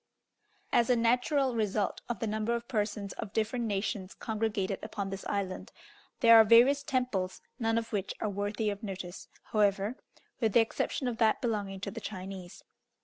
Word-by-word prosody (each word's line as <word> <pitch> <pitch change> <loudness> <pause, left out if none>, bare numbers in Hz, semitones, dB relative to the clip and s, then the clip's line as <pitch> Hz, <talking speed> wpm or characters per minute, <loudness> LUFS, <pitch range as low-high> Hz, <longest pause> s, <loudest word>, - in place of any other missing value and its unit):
As 235 +1 +4
a 250 - +5
natural 250 +3 +2
result 210 -2 0
of 240 - -1
the 225 - -2
number 220 +2 0
of 235 0 -5
persons 205 -3 -2
of 200 - -5
different 230 +2 0
nations 200 -2 -2
congregated 210 -3 -2
upon 205 -2 -4
this 195 0 -5
island, 195 -2 -3 0.5
there 230 -2 +9
are 225 - +10
various 240 +6 +6
temples, 250 -10 -1 0.2
none 225 -1 +1
of 230 0 -3
which 200 -2 -2
are - - -1
worthy 205 +1 -1
of 200 +1 -6
notice, 190 -4 -6 0.2
however, 205 +2 +2 0.4
with 225 -4 +1
the - - +7
exception 230 +3 0
of 240 -2 -2
that 220 -2 +3
belonging 205 -5 -2
to 200 - -3
the - - -7
Chinese. 185 -2 -7
215 Hz, 170 wpm, -30 LUFS, 200-230 Hz, 0.5 s, are